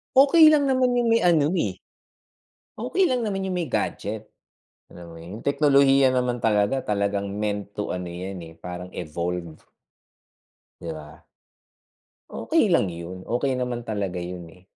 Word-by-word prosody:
Okey 290 Hz, +4 st, +7 dB
lang 290 Hz, -3 st, +5 dB
naman 255 Hz, -1 st, +2 dB
yung 240 Hz, -1 st, +2 dB
may 230 Hz, -, +5 dB
ano, 155 Hz, -4 st, +4 dB
eh, 100 Hz, -, -1 dB, 1.0 s
okey 300 Hz, -, +1 dB
lang 245 Hz, -3 st, 0 dB
naman 195 Hz, -2 st, -2 dB
yung 185 Hz, -1 st, -2 dB
may 170 Hz, -, -2 dB
gadget. 110 Hz, -2 st, -3 dB, 0.6 s
Alam 85 Hz, -1 st, -11 dB
mo 85 Hz, -, -12 dB
yun, 85 Hz, +4 st, -9 dB
yung -, -, -15 dB
teknolohiya 140 Hz, -2 st, +4 dB
naman 125 Hz, -1 st, 0 dB
talaga, 105 Hz, +2 st, +2 dB
talagang 100 Hz, -1 st, -1 dB
meant 105 Hz, 0 st, -4 dB
to 105 Hz, -, -4 dB
ano 90 Hz, 0 st, -4 dB
yan, 90 Hz, +2 st, -6 dB
eh, 80 Hz, 0 st, -11 dB
parang 90 Hz, +2 st, -7 dB
evolve. 85 Hz, 0 st, -4 dB, 1.2 s
'Di 85 Hz, -, -6 dB
ba? 75 Hz, -1 st, -11 dB, 1.1 s
Okey -, -, +1 dB
lang 100 Hz, -, +3 dB
yun. 85 Hz, +2 st, -7 dB
Okey 130 Hz, +3 st, 0 dB
naman 125 Hz, -2 st, -3 dB
talaga 100 Hz, -5 st, -3 dB
yun, 90 Hz, -1 st, -6 dB
eh. 90 Hz, +2 st, -18 dB
105 Hz, 155 wpm, -24 LUFS, 90-145 Hz, 1.2 s, Okey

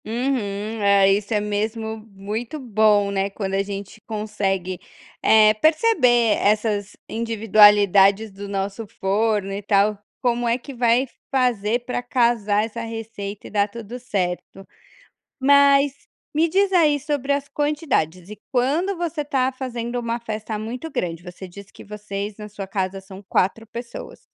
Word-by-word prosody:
Uhum, 220 Hz, -3 st, -2 dB
a 200 Hz, -1 st, +5 dB
isso 200 Hz, +2 st, +1 dB
é 210 Hz, -, +2 dB
mesmo 220 Hz, +2 st, -2 dB
muito 215 Hz, +8 st, -5 dB
bom, 215 Hz, -4 st, +3 dB
né, 195 Hz, 0 st, 0 dB
quando 195 Hz, -1 st, -4 dB
a 195 Hz, -, +2 dB
gente 200 Hz, +1 st, -7 dB
consegue, 195 Hz, -4 st, -2 dB, 0.4 s
eh, 215 Hz, -1 st, +6 dB
perceber, 250 Hz, -, +3 dB
essas 210 Hz, -1 st, 0 dB
individualidades 210 Hz, -2 st, +4 dB
do 200 Hz, +1 st, -8 dB
nosso 200 Hz, +2 st, -3 dB
forno, 200 Hz, 0 st, 0 dB
e 200 Hz, -, -4 dB
tal. 205 Hz, +1 st, +2 dB, 0.2 s
Como 240 Hz, -1 st, 0 dB
é 235 Hz, +1 st, +2 dB
que 275 Hz, +2 st, -10 dB
vai 240 Hz, +1 st, +2 dB, 0.2 s
fazer 240 Hz, -3 st, +1 dB
pra 250 Hz, -, -2 dB
casar 230 Hz, -4 st, +1 dB
essa 230 Hz, +1 st, -6 dB
receita 225 Hz, -3 st, -6 dB
e -, -, -12 dB
dar 205 Hz, -1 st, +2 dB
tudo 230 Hz, +2 st, -8 dB
certo. 195 Hz, -4 st, -4 dB, 0.7 s
Mas, 280 Hz, 0 st, +4 dB, 0.3 s
me 320 Hz, +3 st, +3 dB
diz 390 Hz, +3 st, +2 dB
aí 310 Hz, -5 st, +4 dB
sobre 285 Hz, -1 st, -1 dB
as 280 Hz, 0 st, -2 dB
quantidades, 280 Hz, -, -1 dB
e 210 Hz, -, -9 dB
quando 300 Hz, +10 st, +1 dB
você 335 Hz, -3 st, -3 dB
tá 265 Hz, -3 st, +1 dB
fazendo 245 Hz, -2 st, -4 dB
uma 235 Hz, 0 st, -2 dB
festa 215 Hz, -1 st, -5 dB
muito 240 Hz, +8 st, -5 dB
grande, 175 Hz, -, -3 dB
você 180 Hz, +1 st, -9 dB
disse 195 Hz, +2 st, -13 dB
que -, -, -13 dB
vocês, 205 Hz, 0 st, -6 dB
na 210 Hz, 0 st, -7 dB
sua 205 Hz, -1 st, -7 dB
casa 190 Hz, 0 st, -2 dB
são 190 Hz, 0 st, -12 dB
4 225 Hz, +5 st, 0 dB
pessoas. 235 Hz, +2 st, -8 dB
220 Hz, 150 wpm, -22 LUFS, 200-245 Hz, 0.7 s, eh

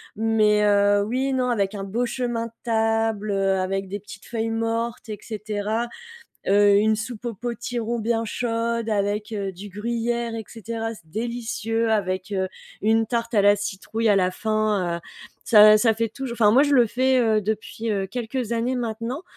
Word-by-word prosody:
Mais, 215 Hz, -1 st, +3 dB
heu, 205 Hz, 0 st, +4 dB
oui 255 Hz, +5 st, -1 dB
et 270 Hz, -, 0 dB
non, 255 Hz, -1 st, +1 dB
avec 200 Hz, -3 st, 0 dB
un 195 Hz, -, -4 dB
beau 230 Hz, +6 st, -1 dB
chemin 240 Hz, -2 st, -2 dB
de -, -, -15 dB
table, 225 Hz, -2 st, 0 dB
avec 195 Hz, 0 st, 0 dB
des 200 Hz, +2 st, -5 dB
petites 200 Hz, 0 st, -12 dB
feuilles 225 Hz, -1 st, -2 dB
mortes 230 Hz, 0 st, -2 dB
et 210 Hz, -, -5 dB
cetera. 215 Hz, +1 st, -3 dB, 0.6 s
Heu, 205 Hz, +1 st, +5 dB
une 215 Hz, +1 st, +3 dB
soupe 225 Hz, +2 st, -6 dB
au 235 Hz, -, -2 dB
potiron 235 Hz, +1 st, -3 dB
bien 225 Hz, +1 st, 0 dB
chaude 230 Hz, 0 st, -2 dB
avec, 210 Hz, +1 st, -1 dB
heu, 200 Hz, -2 st, -2 dB
du 190 Hz, +3 st, -10 dB
gruyère 235 Hz, +3 st, -2 dB
et 225 Hz, -1 st, -4 dB
cetera. 225 Hz, 0 st, -5 dB
C'est 160 Hz, -6 st, -18 dB
délicieux 230 Hz, 0 st, -2 dB
avec, 190 Hz, -2 st, -1 dB
heu, 190 Hz, -1 st, 0 dB, 0.3 s
une 225 Hz, +1 st, +3 dB
tarte 235 Hz, +1 st, -2 dB
à 205 Hz, -, +5 dB
la 205 Hz, 0 st, +6 dB
citrouille 205 Hz, +3 st, -2 dB
à 205 Hz, -, +5 dB
la 185 Hz, -1 st, +2 dB
fin, 210 Hz, -4 st, 0 dB
heu, -, -, -8 dB, 0.4 s
ça 215 Hz, -1 st, +8 dB
ça 225 Hz, 0 st, +3 dB
fait 230 Hz, +1 st, -1 dB
toujours, 265 Hz, 0 st, -6 dB
enfin, 210 Hz, -2 st, +6 dB
moi, 260 Hz, +6 st, +6 dB
je 290 Hz, -1 st, +1 dB
le 245 Hz, -4 st, +5 dB
fais, 260 Hz, +3 st, +2 dB
heu, 220 Hz, -3 st, +3 dB
depuis, 220 Hz, +2 st, -3 dB
heu, 195 Hz, -2 st, -1 dB
quelques 235 Hz, +2 st, -3 dB
années 235 Hz, +3 st, 0 dB
maintenant 235 Hz, +5 st, -4 dB
225 Hz, 185 wpm, -24 LUFS, 205-235 Hz, 0.6 s, ça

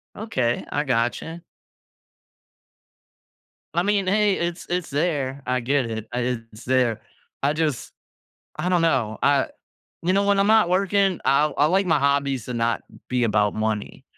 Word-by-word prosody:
Okay, 130 Hz, -, -1 dB
I 145 Hz, -, -1 dB
gotcha. 135 Hz, +6 st, -1 dB, 2.3 s
I 175 Hz, -, +2 dB
mean, 200 Hz, 0 st, +1 dB
hey, 205 Hz, +1 st, +3 dB
it's 170 Hz, 0 st, -3 dB
it's 175 Hz, 0 st, -2 dB
there. 140 Hz, -3 st, -1 dB
I 125 Hz, 0 st, 0 dB
get 130 Hz, 0 st, 0 dB
it. 110 Hz, -1 st, -5 dB
I 120 Hz, -, -2 dB, 0.3 s
It's 105 Hz, +3 st, -13 dB
there. 125 Hz, -3 st, +1 dB, 0.4 s
I 145 Hz, +2 st, +2 dB
just, 155 Hz, -5 st, -2 dB, 0.6 s
I -, -, -2 dB
don't 180 Hz, -2 st, +3 dB
know. 110 Hz, -9 st, +1 dB
I 140 Hz, -1 st, +3 dB, 0.6 s
you 185 Hz, -, +2 dB
know, 200 Hz, +1 st, +3 dB
when 200 Hz, 0 st, +3 dB
I'm 200 Hz, -, +3 dB
not 220 Hz, -4 st, +5 dB
working, 195 Hz, 0 st, +2 dB
I 140 Hz, +2 st, +4 dB
I 145 Hz, -, +4 dB
like 190 Hz, +5 st, +2 dB
my 165 Hz, -, +3 dB
hobbies 140 Hz, -3 st, +1 dB
to 125 Hz, -, -5 dB
not 115 Hz, 0 st, 0 dB, 0.3 s
be 125 Hz, -1 st, +1 dB
about 105 Hz, -2 st, +2 dB
money. 110 Hz, -1 st, -3 dB
145 Hz, 155 wpm, -23 LUFS, 120-180 Hz, 2.3 s, not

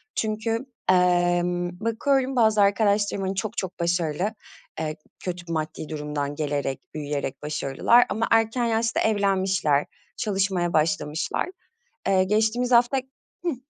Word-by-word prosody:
Çünkü, 225 Hz, +2 st, -1 dB, 0.2 s
emm, 175 Hz, -1 st, +2 dB
bakıyorum 260 Hz, +4 st, +1 dB
bazı 220 Hz, -3 st, +4 dB
arkadaşlarım, 200 Hz, 0 st, +2 dB
hani, 190 Hz, +1 st, -2 dB
çok 215 Hz, +3 st, -3 dB
çok 185 Hz, -1 st, -4 dB
başarılı, 170 Hz, +3 st, 0 dB, 0.5 s
eee, 155 Hz, -1 st, -2 dB, 0.2 s
kötü 175 Hz, -2 st, -5 dB
maddi 155 Hz, -1 st, -4 dB
durumdan 150 Hz, -1 st, -3 dB
gelerek, 145 Hz, -3 st, -2 dB
büyüyerek 145 Hz, -3 st, -4 dB
başarılılar 150 Hz, -, +3 dB
ama 225 Hz, +2 st, 0 dB
erken 225 Hz, +2 st, +3 dB
yaşta 225 Hz, 0 st, +1 dB
evlenmişler, 190 Hz, -8 st, +2 dB, 0.3 s
çalışmaya 190 Hz, -4 st, 0 dB
başlamışlar. 155 Hz, -, 0 dB, 0.6 s
Eee, 190 Hz, -1 st, +4 dB
geçtiğimiz 220 Hz, +5 st, +1 dB
hafta 240 Hz, +2 st, +5 dB, 0.5 s
Hıh. 335 Hz, -, 0 dB
190 Hz, 115 wpm, -25 LUFS, 160-220 Hz, 0.6 s, hafta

